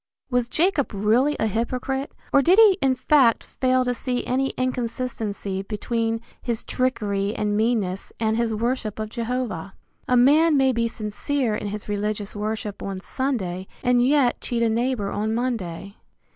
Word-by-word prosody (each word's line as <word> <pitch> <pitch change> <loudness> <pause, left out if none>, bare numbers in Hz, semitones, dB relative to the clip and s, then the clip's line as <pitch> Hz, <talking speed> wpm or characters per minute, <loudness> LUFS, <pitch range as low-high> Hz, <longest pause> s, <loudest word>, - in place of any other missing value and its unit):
Was 245 -1 +1
Jacob 315 - +1
really 235 +9 +2
a - - +2
hypocrite, 250 +5 -2 0.2
or 280 - +6
did 355 +7 +4
he 435 -4 +8
in 265 -1 +3
fact 255 -4 +4
fail 255 -1 +1
to 250 - +1
see 245 +1 -3
any 265 +2 0
inconsistency 230 -6 -2
between, 225 +2 -2 0.2
his 235 -2 -3
trickery 210 -5 -1
and 210 -1 0
meanness 210 -4 0
and 220 -1 +1
his 235 0 0
worship 230 0 -2
of 215 0 -4
Jehovah? 235 -6 -3 0.3
A 250 - +3
man 295 +5 +5
may 265 -1 +4
be 235 -1 0
sincere 230 +3 -2
in 210 - -3
his 210 +1 -6
religious 205 0 -2
worship 210 -1 -4
on 195 -1 -4
Sunday 190 -6 -3 0.2
and 245 -1 +3
yet 265 -1 +3
cheat 235 -1 -1
a 230 - +3
neighbor 230 -2 0
on 215 +2 -1
Monday. 200 -6 -3
235 Hz, 160 wpm, -24 LUFS, 210-255 Hz, 0.3 s, he